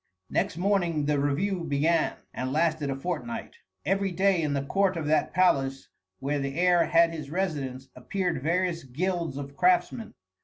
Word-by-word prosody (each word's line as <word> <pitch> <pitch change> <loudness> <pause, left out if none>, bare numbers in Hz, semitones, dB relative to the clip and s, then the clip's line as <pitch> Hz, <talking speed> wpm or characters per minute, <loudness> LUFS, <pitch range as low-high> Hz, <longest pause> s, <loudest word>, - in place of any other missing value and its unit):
Next - - 0
morning 175 -5 +1
the 145 -1 +1
review 170 +7 0
began, 160 +2 +1 0.2
and 130 +1 -3
lasted 155 -1 +1
a 135 - -1
fortnight. 180 - -5 0.3
Every 195 0 +1
day 190 0 +2
in 150 -2 0
the 140 - -1
court 190 +4 +1
of 160 - -3
that 155 +1 +2
palace 135 -7 +1 0.3
where 145 +2 -1
the 140 +3 -3
heir 175 -1 +4
had 165 0 +4
his 155 -4 -6
residence 145 -7 -3
appeared 175 +3 -2
various 170 +2 0
guilds 165 +3 -2
of 140 0 -7
craftsmen. 185 +6 +1
165 Hz, 160 wpm, -27 LUFS, 140-185 Hz, 0.3 s, heir